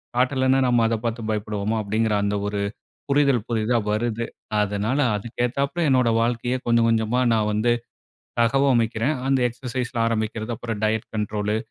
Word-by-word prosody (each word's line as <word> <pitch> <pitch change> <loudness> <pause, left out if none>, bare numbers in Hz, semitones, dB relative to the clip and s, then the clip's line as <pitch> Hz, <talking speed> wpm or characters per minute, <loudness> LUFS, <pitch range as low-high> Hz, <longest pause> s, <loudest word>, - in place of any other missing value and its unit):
காட்டலன்னா, 130 +1 +2
நம்ம 120 -2 +3
அத 115 0 +1
பார்த்து 115 0 -2
பயப்படுவோமா! 105 0 -2
அப்படிங்கிற 110 +2 0
அந்த 100 0 0
ஒரு 100 0 -2 0.5
புரிதல் 140 -5 +3
புதித 115 +1 +1
வருது. 115 +2 -1 0.4
அதனால 105 +7 -1 0.2
அதுக்கு 115 +3 -5
ஏத்தாப்புல 140 +7 -1
என்னுடைய 125 -3 +3
வாழ்க்கையை 120 +2 0
கொஞ்சம் 115 -1 +4
கொஞ்சமா 115 +2 +1
நான் 110 -1 +1
வந்து, 110 +3 +1 0.7
தகவமைக்கிறேன். 120 +1 +2
அந்த 135 0 +3
எக்சர்சைஸ்ல 125 -1 -4
ஆரம்பிக்கிறது, 110 0 -2
அப்புறம் 115 -2 -5
டயட் 110 0 0
கண்ட்ரோலு 105 0 -1
115 Hz, 140 wpm, -23 LUFS, 110-125 Hz, 0.7 s, கொஞ்சம்